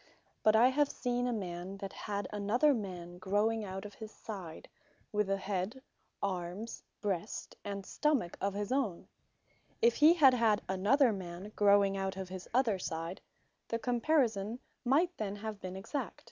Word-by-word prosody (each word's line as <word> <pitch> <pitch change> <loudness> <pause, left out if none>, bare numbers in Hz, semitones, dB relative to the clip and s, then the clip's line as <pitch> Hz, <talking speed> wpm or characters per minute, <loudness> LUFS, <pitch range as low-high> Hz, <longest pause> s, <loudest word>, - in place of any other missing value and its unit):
But 215 0 +5
I 240 +3 +7
have 285 +2 +2
seen 245 0 -1
a - - +1
man, 185 -3 -4
that 195 -1 -6
had 200 -2 -3
another 225 +9 +3
man 180 -6 -5
growing 210 +4 +1
out 195 0 -5
of 205 - -8
his 220 0 -9
side, 190 -9 -8 0.4
with 210 -2 +1
an 195 - +2
head, 195 +5 -2 0.4
armes, 185 +3 -3 0.2
breast, 200 0 -3
and 200 -1 -5
stomach, 280 - +1
of 200 0 0
his 205 +2 -2
own: 255 -10 0 0.7
If 470 +1 +4
he 310 +3 +7
had 275 -6 +7
had 225 -4 +3
another 215 +7 +4
man 185 +1 -7
growing 200 -1 +5
out 195 0 -2
of 190 -1 -5
his 185 -1 -7
other 235 -6 +2
side, 165 +1 -4 0.5
the 230 - -1
comparison 235 -3 +1 0.3
might 325 +8 +3
then 205 -2 -2
have 210 0 -6
been 185 0 -5
exact. 200 +9 -4
205 Hz, 160 wpm, -33 LUFS, 190-240 Hz, 0.7 s, I